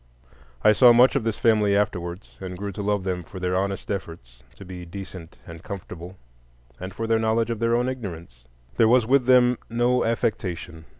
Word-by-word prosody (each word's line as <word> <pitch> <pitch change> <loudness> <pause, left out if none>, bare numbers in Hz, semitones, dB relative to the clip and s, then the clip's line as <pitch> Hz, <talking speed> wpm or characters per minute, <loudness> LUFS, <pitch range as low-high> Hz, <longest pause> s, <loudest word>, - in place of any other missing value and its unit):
I - - +7
saw 120 +3 +7
much 125 +4 +5
of 135 - +1
this 115 -1 -2
family 105 -3 +3
afterwards, 90 -2 -3
and 90 -1 -7
grew 100 +1 -5
to 100 - -6
love 100 -1 -1
them 90 -2 -3
for 95 +4 -10
their 90 0 -1
honest 100 +1 -2
efforts 70 -11 -7
to 100 - -12
be 90 -1 -8
decent 90 -1 -10
and 85 -1 -10
comfortable, 90 -2 -9 0.6
and 95 +1 -6
for 115 - -5
their 115 0 +2
knowledge 110 +1 +1
of 115 - -3
their 115 0 +2
own 120 +1 +1
ignorance. 85 - -7 0.3
There 115 - +5
was 120 0 +4
with 130 +1 +2
them 125 -1 +5
no 120 +2 +1
affectation. 90 -8 -3
100 Hz, 190 wpm, -24 LUFS, 90-115 Hz, 0.6 s, I